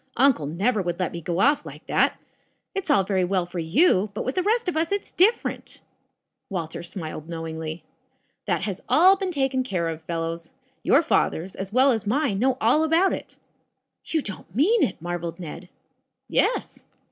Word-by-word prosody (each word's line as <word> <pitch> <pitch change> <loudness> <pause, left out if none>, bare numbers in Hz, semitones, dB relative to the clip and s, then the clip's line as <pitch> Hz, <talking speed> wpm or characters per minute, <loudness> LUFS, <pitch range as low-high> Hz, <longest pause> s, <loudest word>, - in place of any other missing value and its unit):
"Uncle 255 - +3
never 200 - 0
would 175 -1 -3
let 185 - -1
me 170 - -6
go 170 +2 -2
off 285 +8 +3
like - - -11
that. - - +1 0.5
It's 390 -4 -4
all 270 -9 +4
very 190 -1 0
well 180 0 0
for 175 0 -6
you, 200 - +3
but - - -3
with 255 - -1
the 370 - +1
rest 445 +3 +1
of 360 - -1
us 320 +2 0
it's 405 0 -2
different." 435 +6 +1 0.7
Walter 170 -4 -4
smiled 165 -3 -7
knowingly. 160 -1 -5 0.6
"That 175 -3 0
has 195 -2 -3
all 370 +5 +6
been 385 -1 -3
taken 270 -4 0
care 185 -9 -2
of, 160 0 -5
fellows. 165 0 -4 0.3
Tour - - +4
fathers, 180 +4 0
as 190 0 -6
well 260 +4 +5
as 220 -3 -2
mine, 245 -3 +1
know 260 +2 +2
all 245 +8 +3
about 330 +4 +3
it." - - -7 0.7
"You 315 -3 -1
don't 185 -2 -7
mean 390 - +4
it?" 185 - 0
marveled 170 0 -4
Ned. 170 +1 -8 0.6
"Yes." - - 0
195 Hz, 180 wpm, -24 LUFS, -, 0.7 s, all